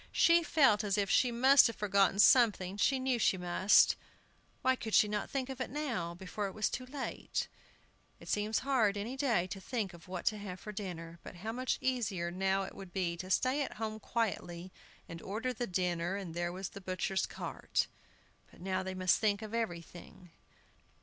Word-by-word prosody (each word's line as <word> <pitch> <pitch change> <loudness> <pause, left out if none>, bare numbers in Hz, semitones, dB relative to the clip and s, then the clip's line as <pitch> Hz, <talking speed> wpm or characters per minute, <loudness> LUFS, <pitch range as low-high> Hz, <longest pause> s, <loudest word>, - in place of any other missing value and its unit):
She 340 0 +5
felt 270 -10 +3
as 200 -1 0
if 200 -1 0
she 250 - +4
must 265 +4 +6
have 230 - -5
forgotten 200 -1 +2
something; 210 -5 +5
she 265 +6 +2
knew 260 -2 0
she 195 - +3
must. 180 +3 +4 0.7
Why 260 0 +4
could 220 -4 -2
not 210 0 -3
she - - -19
think 270 -2 -2
of 265 -1 -6
it 255 - -2
now, 235 - -3
before 190 +3 -4
it 190 - -9
was 215 - 0
too 255 0 -5
late? 270 0 -4 0.7
It - - -14
seems 210 +1 0
hard 230 -7 +2
any 225 +6 -4
day 240 -10 +1
to 190 +1 -7
think 210 -2 -3
what 175 +1 -8
to 215 -1 +1
have 185 -3 -7
for 210 - -7
dinner, 170 -5 -7
but - - -10
how 210 +6 -5
much 255 +2 -1
easier 210 -10 -1
now 190 +2 0
it 190 - -7
would 190 -2 -10
be 175 -3 -1
to 185 +1 -7
stay 255 +8 +2
at 280 - -3
home 220 0 -4
quietly 190 -6 -3 0.4
and 165 0 -8
order 230 +6 -3
the 240 0 -3
dinner, 180 0 -1
and 190 -5 -5
there 175 0 -2
was 185 +1 -5
the 200 - -10
butcher's 185 +1 -1
cart! - - -2 0.6
But - - -19
now 185 +1 -1
they 190 0 -5
must 185 -1 +2
think 210 -1 +1
of 215 0 -8
everything. 175 -4 -5
205 Hz, 195 wpm, -33 LUFS, 185-240 Hz, 0.7 s, must